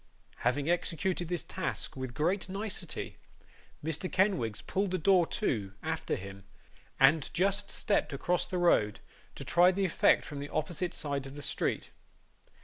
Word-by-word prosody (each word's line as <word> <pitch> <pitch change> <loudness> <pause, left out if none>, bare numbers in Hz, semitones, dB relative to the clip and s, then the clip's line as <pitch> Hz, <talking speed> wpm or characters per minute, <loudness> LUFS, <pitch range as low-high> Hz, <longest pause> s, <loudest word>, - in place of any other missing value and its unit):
Having 140 +4 0
executed 175 +1 0
this 175 -2 -1
task - - -3
with 130 -2 -5
great 180 +5 0
nicety, 200 +2 -4 0.7
Mr. 160 +3 -2
Kenwigs 185 - +1
pulled 195 +1 0
the 185 - 0
door 180 0 +4
to, 100 -5 -1
after - - -1
him, 100 +1 -8 0.6
and 140 +2 +5
just 195 +3 +1
stepped 205 - 0
across 175 +5 0
the 185 - -2
road 110 - +3 0.4
to - - -8
try 175 +1 +5
the 195 +1 0
effect 180 - +4
from 145 -2 -6
the 145 +1 -5
opposite 175 +3 -2
side 140 -2 -2
of 135 - -10
the 145 - -7
street. - - -1
165 Hz, 150 wpm, -31 LUFS, 140-185 Hz, 0.7 s, and